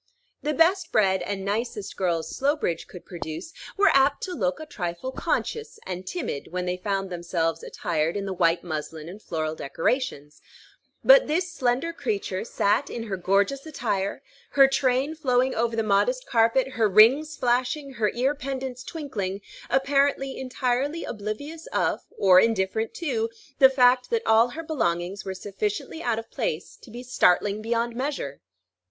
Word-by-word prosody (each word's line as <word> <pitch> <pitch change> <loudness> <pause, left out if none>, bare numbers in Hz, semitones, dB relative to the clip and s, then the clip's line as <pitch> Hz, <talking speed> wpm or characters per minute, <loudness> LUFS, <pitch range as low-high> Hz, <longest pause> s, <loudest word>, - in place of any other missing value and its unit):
The 300 0 -1
best 355 +5 +3
bred 190 -3 +3
and 195 -1 -4
nicest 210 0 -3
girls 170 -4 -1
Slowbridge 275 - 0
could 180 - -12
produce 170 - -7 0.2
were 400 0 +5
apt 275 +1 +3
to 370 - -3
look 190 - -1
a 315 - -7
trifle 180 - -4
conscious 450 +11 -2
and 185 0 -6
timid 250 - -4
when 180 0 -2
they 180 0 -1
found 195 0 -2
themselves 170 -1 -1
attired 165 +1 -2
in 200 - -3
the 195 - -3
white 170 -1 +2
muslin 155 -1 -5
and 195 +5 -9
floral 155 -4 -3
decorations; 150 - -2 0.6
but - - +7
this 335 +3 -1
slender 260 +4 0
creature 205 - -2
sat 225 +3 +1
in 235 - -5
her 210 -4 -3
gorgeous 200 +9 +1
attire, 220 -5 -2 0.3
her 275 -1 +7
train 270 +2 +1
flowing 260 -4 +1
over 230 0 0
the 225 - +1
modest - - +1
carpet, 230 +3 +2
her 230 -5 +1
rings 260 +10 +5
flashing, 255 +3 0
her 215 -4 +1
ear 260 +4 +2
pendants 265 -3 -5
twinkling, 215 - -4 0.3
apparently 275 0 +2
entirely 260 +4 -1
oblivious 240 +10 -6
of, - - 0 0.2
or 185 -2 +7
indifferent 220 +1 0
to, 240 -9 -1 0.3
the 265 - +9
fact 250 -1 +4
that 465 -1 0
all 225 +2 +5
her 310 +7 -7
belongings 190 - -1
were 190 -1 -5
sufficiently 205 - -4
out 235 -6 0
of 225 - -7
place - - -3
to - - -16
be 240 +3 -8
startling 205 -3 +2
beyond 235 +1 -1
measure. 255 - -3
230 Hz, 160 wpm, -25 LUFS, 190-275 Hz, 0.6 s, the